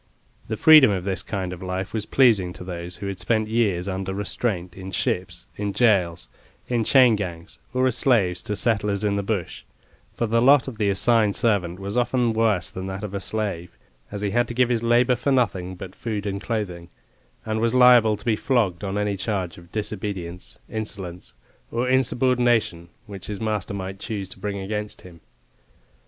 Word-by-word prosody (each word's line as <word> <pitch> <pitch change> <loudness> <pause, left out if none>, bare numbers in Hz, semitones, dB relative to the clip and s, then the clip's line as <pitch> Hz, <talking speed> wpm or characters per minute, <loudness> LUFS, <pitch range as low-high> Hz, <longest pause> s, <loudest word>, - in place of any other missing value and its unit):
The 110 - -3
freedom 155 -3 +8
of 95 -3 -1
this 95 0 -2
kind 95 -3 -4
of 90 - -10
life 95 +2 -4
was 110 -2 -3
pleasing 105 -9 +3
to - - -10
those 90 -1 -6
who 100 - -6
had 100 -1 -5
spent 110 -2 0
years 105 -5 0
under 95 0 -3
restraint 95 -3 -2
in 95 +1 -8
ships, 90 -2 -2
in 100 -1 -2
gaols, 90 -8 +2 0.4
in 120 -2 0
chain 125 -1 +5
gangs, 90 -3 -6
or 130 +1 +1
as 130 -1 +1
slaves 95 -9 +2
to 105 - -3
settlers 105 -2 0
in 100 -1 +1
the 100 - 0
bush, 100 -3 -3 0.5
for 115 - 0
the 115 +1 +1
lot 135 +2 +5
of 120 -5 -7
the 105 -2 +2
assigned 105 +1 +3
servant 95 -6 +1
was 100 +3 -4
often 120 -1 +1
worse 110 -6 +1
than 95 +1 -6
that 95 +2 -5
of 105 -2 -5
a 100 - -2
slave, 100 -5 -3 0.3
as 100 0 -5
he 100 - 0
had 120 +2 +2
to 120 - -6
give 125 0 +3
his 120 -2 +1
labour 120 +2 +3
for 130 +3 -1
nothing 95 -8 0
but 95 0 -9
food 105 -2 -4
and 100 -1 -3
clothing, 90 -7 -4 0.6
and 110 0 -2
was 115 +1 +1
liable 120 -4 +6
to 105 - -16
be 115 -2 +2
flogged 105 -7 0
on 100 0 -2
any 105 -1 0
charge 95 -4 -3
of 85 0 -18
disobedience, 95 -5 -5
insolence, 95 - -6 0.3
or 120 +2 -1
insubordination 125 -8 +1 0.2
which 100 -3 -9
his 105 -2 -5
master 105 -3 -2
might 95 0 -6
choose 100 -4 -4
to 95 - -12
bring 100 +1 -3
against 105 +2 -4
him. 85 -2 -14
105 Hz, 190 wpm, -23 LUFS, 95-115 Hz, 0.6 s, freedom